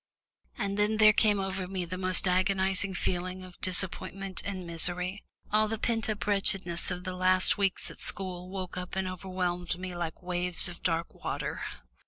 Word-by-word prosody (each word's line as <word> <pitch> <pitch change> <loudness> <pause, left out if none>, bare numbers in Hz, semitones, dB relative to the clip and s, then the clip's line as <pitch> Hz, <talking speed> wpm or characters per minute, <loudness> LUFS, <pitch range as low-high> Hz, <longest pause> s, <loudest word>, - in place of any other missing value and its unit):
And 200 +1 -2
then 210 +1 +2
there 215 -1 +8
came 210 -1 +3
over 190 -1 -2
me 185 -1 -3
the 175 +2 -5
most 185 0 +2
agonising 190 +1 +2
feeling 185 +1 -2
of 180 -1 -13
disappointment 190 +1 +1
and 190 -2 -4
misery. 180 +3 -1 0.3
All 215 +1 +4
the 225 +1 -2
pent 225 0 0
up 210 -1 -2
wretchedness 195 -4 +1
of 180 - -4
the 185 -1 -4
last 185 +2 +4
weeks 195 -2 +1
at - - -11
school 185 -2 -2
woke 185 -2 -5
up 180 0 -5
and 190 0 -1
overwhelmed 180 -1 -2
me 180 -1 -6
like 170 +1 -4
waves 180 0 +2
of 175 -1 -8
dark 165 -1 -1
water. - - -4
185 Hz, 175 wpm, -30 LUFS, 180-195 Hz, 0.3 s, there